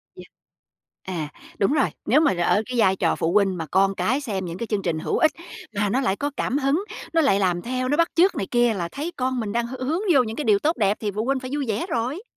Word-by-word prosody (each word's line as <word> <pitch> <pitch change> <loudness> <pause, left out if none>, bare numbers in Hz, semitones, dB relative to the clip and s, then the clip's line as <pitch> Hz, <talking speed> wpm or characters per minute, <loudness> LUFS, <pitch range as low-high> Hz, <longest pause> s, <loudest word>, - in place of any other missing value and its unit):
Yeah. - - -12 0.8
À, 170 -5 -4 0.3
đúng 205 +7 +2
rồi, 285 -3 +2 0.2
nếu 290 +6 +4
mà 310 - +3
r - - -9
ở 175 +4 +2
cái 250 -1 -2
vai 190 -3 +4
trò 170 -3 +1
phụ 165 - -1
huynh 195 -3 +3
mà 165 - -4
con 195 +5 +2
cái 260 +7 0
xem 200 -8 -3
những 170 0 -6
cái 230 - -4
chương 210 -2 -1
trình 165 -4 -1
hữu - - -1
ích, 315 - +4 0.4
mà 205 0 +1
nó 255 +7 +1
lại 215 -7 +1
có 285 +6 -3
cảm 255 - 0
hứng, 290 +6 +1 0.3
nó 330 - +4
lại 265 -10 +3
làm 180 -3 +1
theo, 255 +4 -2
nó 290 - +1
bắt 335 0 +4
chước 355 +3 +4
này 195 - -3
kia 240 -1 +3
là 175 -4 -3
thấy 305 +5 -4
con 255 0 -1
mình 215 -3 -3
đang 235 +2 -1
h 255 - -7
hướng 300 +8 -1
vô 265 -4 +5
những 220 -1 -5
cái 300 - -3
điều 210 -2 +4
tốt 315 +7 0
đẹp, 205 -1 +2
thì 210 -2 -1
phụ 210 +3 -3
huynh 270 +1 +1
phải 255 0 -7
vui 290 -2 -1
vẻ 220 +7 -1
rồi. 260 - -2
235 Hz, 280 wpm, -23 LUFS, 195-275 Hz, 0.8 s, vô